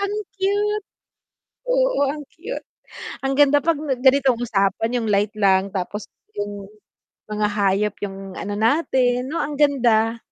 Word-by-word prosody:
Ang 400 0 -1 0.2
cute. 410 +2 0 0.8
Oo, - - +2
ang 295 +1 -6
cute. 450 +10 -7 0.6
Ang 270 - +1
ganda 290 0 +5
'pag 330 -1 +2
nag 275 -4 -2
ganitong 265 -2 +4
usapan 220 0 0
'yong 235 - -2
light 205 +1 +1
lang 195 -1 +3
tapos 200 +2 -4 0.3
'yong 205 -1 -4 0.7
mga 210 0 +1
hayop 200 0 +1
'yong 195 -1 -6
ano 205 - -4
natin, 250 0 +2
'no, 320 - -3
ang 295 - -3
ganda. 235 -6 +3
245 Hz, 140 wpm, -22 LUFS, 205-295 Hz, 0.8 s, ganda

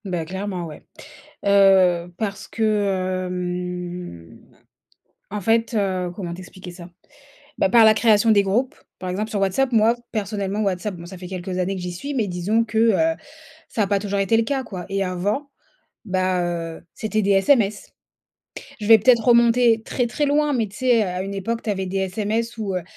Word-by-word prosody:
Bah, 175 -4 -3
clairement, 190 0 -4
ouais. 155 -2 -10 0.6
Heu, 190 -3 +4
parce 200 -1 -4
que, 195 -4 0
hem, 180 - -5 0.9
en 210 +1 -4
fait, 225 +4 +1
heu, 190 -4 0
comment 175 -4 -5
t'expliquer 180 0 -10
ça? 175 0 -11 0.7
Bah, - - +3
par 230 +3 +6
la 220 - +8
création 220 0 +3
des 205 -2 +5
groupes, 225 +7 0 0.2
par 185 - -5
exemple 210 +4 -2
sur 210 - -3
WhatsApp, 195 +8 +1
moi, 225 +1 +4 0.2
personnellement 200 -1 -2
WhatsApp, 195 0 -2
bon, 170 - -10
ça 180 +2 -10
fait 180 - -8
quelques 185 0 -5
années 185 +2 -1
que 185 - -6
j'y 180 0 -4
suis, 280 +12 -6
mais 230 -5 0
disons 195 +5 0
que, 220 0 -3
heu, 230 +9 +3 0.5
ça 220 - -1
a - - +1
pas 200 0 +1
toujours 200 0 -3
été 195 +3 +2
le 230 - +2
cas, 265 +2 -2
quoi. 180 -6 -7
Et 195 0 -1
avant, 200 +10 -2 0.6
bah, 185 -2 0
heu, 170 -2 -4
c'étaient 215 0 -1
des 200 0 +2
SMS. 200 0 +2 0.9
Je 210 - -4
vais 225 0 +8
peut-être 235 +1 +4
remonter 235 -1 +4
très, 245 0 -1
très 290 +5 -1
loin, 295 +1 +2
mais 225 -4 0
tu 200 - -14
sais? 245 -3 +3
Heu, - - -3
à 180 +1 -3
une 200 +1 -5
époque 230 +4 -3
tu 220 - -2
avais 190 -2 -2
des 190 +1 -4
SMS 215 +5 -2
où, 200 -3 -3
heu, 180 - -2
200 Hz, 190 wpm, -22 LUFS, 185-225 Hz, 0.9 s, la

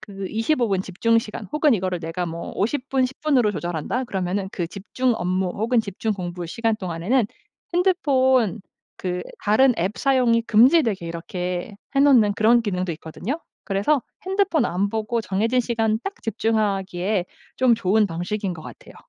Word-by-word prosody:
그 195 -2 -7
25 235 +1 +1
분 190 -2 +1
집중 230 +5 +1
시간 210 -2 -5
혹은 300 -4 +4
'이거를 185 -2 -1
내가 165 +2 -3
뭐 165 +1 -6
50 255 +6 -1
분, 265 -1 +2
10 260 +2 -5
분으로 265 -8 +3
조절한다.' 175 - -2
그러면은 190 -2 -2
그 175 - -2
집중 230 +6 -1
업무 185 0 0
혹은 225 +5 +1
집중 215 +1 -3
공부 175 -2 -5
시간 225 +5 0
동안에는 190 +6 0 0.5
핸드폰 260 - +2 0.4
그 180 -1 -3 0.2
다른 245 +4 +4
앱 190 +6 -1
사용이 250 -4 +3
금지되게 230 - +4
이렇게 180 +4 -4 0.2
해 275 - +4
놓는 250 -8 +5
그런 230 +3 +4
기능도 185 -4 -2
있거든요. 175 - -5 0.3
그래서 200 +9 +1 0.3
핸드폰 380 -8 +2
안 195 0 0
보고 220 +2 -1
정해진 225 +6 +1
시간 225 -2 0
딱 395 - -4
집중하기에 200 -4 0 0.3
좀 250 -2 +4
좋은 215 0 +2
방식인 180 +2 -3
것 160 - -10
같아요. - - -12
215 Hz, 320 characters per minute, -23 LUFS, 185-245 Hz, 0.5 s, 놓는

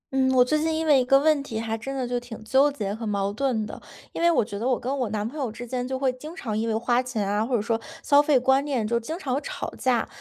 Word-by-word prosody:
嗯， 260 0 +3
我 250 - +6
最 305 +4 +1
近 320 +1 0
因 320 0 -1
为 285 -4 +5
一 - - +1
个 275 +2 +6
问 300 0 +3
题 230 -5 -5
还 225 0 -2
真 270 +5 -5
的 255 -2 -2
就 245 0 -1
挺 235 -3 -10
纠 270 +6 +4
结 205 -8 -3
和 225 +2 -7
矛 200 -2 -1
盾 230 -3 0
的。 - - -9 0.3
因 - - -5
为 340 - +5
我 320 -10 +3
觉 205 -2 -6
得 235 - -1
我 255 - +1
跟 260 +3 -2
我 245 -4 -1
男 210 0 -2
朋 290 +6 -7
友 250 -5 -2
之 240 - -8
间 250 +1 -3
就 260 0 -2
会 260 -1 +1
经 300 +6 -10
常 230 - -4
因 225 +1 -1
为 220 - 0
花 240 +2 +2
钱 230 -6 -3
啊， 205 +2 +1
或 245 +2 -1
者 215 - +1
说， 225 0 -1 0.2
消 285 0 +6
费 295 -2 +3
观 265 +2 +3
念 265 -6 -1
就 235 +1 +1
经 310 +8 -5
常 275 -8 -3
会 275 - 0
吵 - - -5
架。 255 -3 +1
250 Hz, 330 characters per minute, -25 LUFS, 225-275 Hz, 0.3 s, 我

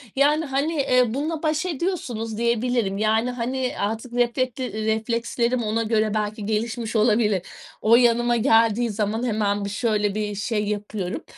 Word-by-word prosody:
Yani, 295 +3 +3
hani, 280 +2 -1
ııı, 240 -2 +2
bununla 310 +3 -3
baş 310 +2 0
ediyorsunuz 265 - -3
diyebilirim. 235 -3 0
Yani, 220 +3 +1
hani, 250 +1 -2
artık 225 +4 -3
reflekleri 245 -2 -1
reflekslerim 235 +2 0
ona 220 +2 0
göre 215 -1 +1
belki 210 -1 -2
gelişmiş 225 +1 -2
olabilir. 215 -3 +3 0.4
O 225 +2 +5
yanıma 240 0 +3
geldiği 225 +1 +3
zaman 215 +2 -1
hemen 205 -3 0
bir, - - -3
şöyle, 210 -1 0
bir 210 -1 -2
şey 210 +1 -1
yapıyorum. 205 -3 -4
230 Hz, 140 wpm, -23 LUFS, 215-250 Hz, 0.4 s, O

